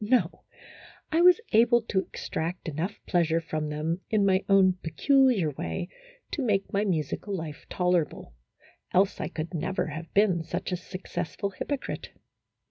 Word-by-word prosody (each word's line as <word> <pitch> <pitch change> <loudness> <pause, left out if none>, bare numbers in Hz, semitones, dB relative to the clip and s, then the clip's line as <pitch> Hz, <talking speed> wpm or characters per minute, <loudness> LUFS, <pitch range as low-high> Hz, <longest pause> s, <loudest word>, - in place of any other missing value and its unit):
No, 210 -6 +1 0.7
I 325 +2 +3
was 360 +3 +7
able 235 +1 +5
to 205 -3 0
extract 175 -1 -4
enough 165 +7 -3
pleasure 165 -2 +2
from 155 -2 -3
them, 160 +4 -2
in 215 -3 +3
my 190 0 +3
own 190 -2 +5
peculiar 250 - +3
way, 85 - -4 0.4
to 300 - -2
make 205 -6 0
my 200 +1 +2
musical 190 +2 -1
life 160 -4 -7
tolerable, 180 - 0 0.6
else 195 +2 +3
I - - -1
could 160 +3 -5
never 180 +4 -1
have 160 +2 -7
been 195 -5 +3
such 180 +3 -4
a - - +1
successful 185 +1 -5
hypocrite. 270 +8 -4
185 Hz, 145 wpm, -27 LUFS, 165-205 Hz, 0.7 s, was